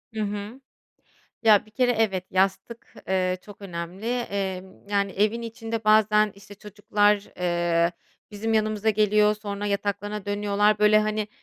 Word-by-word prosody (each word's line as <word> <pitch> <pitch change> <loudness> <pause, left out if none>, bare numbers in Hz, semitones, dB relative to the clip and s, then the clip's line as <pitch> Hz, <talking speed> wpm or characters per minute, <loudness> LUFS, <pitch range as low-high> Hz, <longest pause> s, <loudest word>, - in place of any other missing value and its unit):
Hı 215 - -2
hı. 210 +5 -5 0.8
Ya, 215 -2 +5
bir 215 - -21
kere, 250 +1 +2
evet, 200 -5 0
yastık, 195 +5 -1
eee, 185 -1 0
çok 205 -1 -14
önemli. 180 +2 -7
Emm, 195 -5 -4
yani, 200 -1 0
evin 215 +4 0
içinde 225 -1 -5
bazen, 215 -1 +4
işte, 200 0 -14
çocuklar, 205 0 0
eee, 175 -1 +1 0.4
bizim 225 +2 -2
yanımıza 215 0 +1
geliyor. 210 0 +3
Sonra 205 -1 -5
yataklarına 205 0 -3
dönüyorlar. 205 +1 +1
Böyle, 210 0 +5
hani, 215 0 -1
205 Hz, 135 wpm, -25 LUFS, 195-215 Hz, 0.8 s, Ya